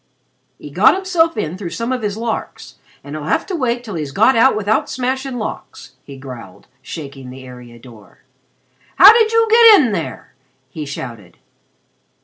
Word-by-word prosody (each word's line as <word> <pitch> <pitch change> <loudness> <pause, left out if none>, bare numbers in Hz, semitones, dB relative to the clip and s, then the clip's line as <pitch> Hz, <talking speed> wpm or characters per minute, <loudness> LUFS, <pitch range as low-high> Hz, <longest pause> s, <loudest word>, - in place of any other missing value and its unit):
"He - - -12
got - - +4
himself 355 -5 0
in 180 -2 -4
through 185 -4 -5
some 230 +8 -4
of 255 -2 -2
his 210 -1 -3
larks, 225 -1 -6 0.2
and 145 +2 -9
he'll 150 -1 -7
have - - -1
to 380 - -5
wait 245 -5 -2
till 215 -4 -8
he's 150 -5 -5
got 225 - +3
out 230 +4 +4
without 215 +1 -1
smashing 260 0 -3
locks," 215 - -8
he 140 -1 -12
growled, 125 -8 -11 0.2
shaking 140 -4 -9
the 130 +1 -11
area 125 -2 -13
door. 115 -4 -17 0.7
"How 415 - +9
did 450 -1 +2
you 455 0 +2
get 455 -3 +8
in 250 -6 +1
there?" 170 -6 -6 0.4
he 150 0 -7
shouted. 115 -10 -9
210 Hz, 170 wpm, -17 LUFS, -, 0.7 s, How